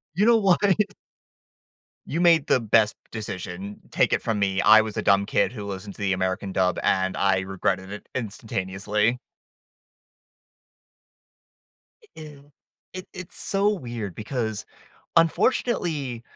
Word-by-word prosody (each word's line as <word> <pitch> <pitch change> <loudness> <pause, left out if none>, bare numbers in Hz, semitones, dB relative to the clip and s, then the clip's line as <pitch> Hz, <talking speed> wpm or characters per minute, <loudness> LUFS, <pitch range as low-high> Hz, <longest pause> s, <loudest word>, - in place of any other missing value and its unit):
You 200 +4 +3
know 235 0 +6
what? 195 -5 +3 1.5
You 165 +4 -2
made 165 -4 +4
the - - +4
best 110 -1 +3 0.2
decision. 100 -2 -6
Take - - +2
it - - +1
from 110 -2 -1
me, 95 -1 +1
I 110 +1 +7
was 110 -1 -6
a - - 0
dumb 100 0 +3
kid - - +1
who 105 -4 -7
listened 100 0 -7
to - - -11
the 100 -1 +1
American 95 +1 -2
dub, 90 -2 +1
and 95 0 +1
I 95 -1 +2
regretted 95 0 -2
it 105 - -9
instantaneously. 105 0 -2 2.8
E 440 - -22
ew. 145 -2 -13 0.4
It 185 0 -7
it's 185 -2 -9
so 200 +1 +1
weird 120 - -4
because, 110 -2 -3 0.5
unfortunately, 165 - +1
110 Hz, 130 wpm, -24 LUFS, 95-145 Hz, 2.8 s, I